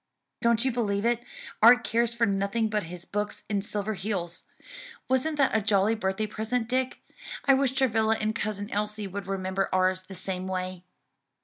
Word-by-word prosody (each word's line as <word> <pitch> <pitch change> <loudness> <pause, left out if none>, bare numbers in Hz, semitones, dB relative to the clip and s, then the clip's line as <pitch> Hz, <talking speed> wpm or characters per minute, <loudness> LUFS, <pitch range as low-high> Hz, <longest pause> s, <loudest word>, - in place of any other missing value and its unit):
"Don't 235 +1 +3
you 260 - +2
believe 210 -3 0
it, 240 0 +1 0.4
Art 245 +2 +8
cares 235 +1 +1
for 235 0 +2
nothing 200 +2 0
but 210 -4 0
his 175 +1 -9
books 210 0 -3
and 205 -2 0
Silverheels. 200 -3 -3 0.6
Wasn't 260 +4 +1
that 275 -5 +3
a 220 - +3
jolly 205 +1 +3
birthday 190 -1 -1
present, 220 +2 -2
Dick? 255 +1 -1 0.4
I 275 - +6
wish 265 -1 +2
Travilla 225 -4 +2
and 215 0 0
Cousin 205 -2 -3
Elsie 210 0 -2
would 195 0 -6
remember 190 0 -1
ours 185 0 +2
the 190 +1 -11
same 185 0 -4
way." 185 -1 -3
210 Hz, 170 wpm, -27 LUFS, 195-235 Hz, 0.6 s, Art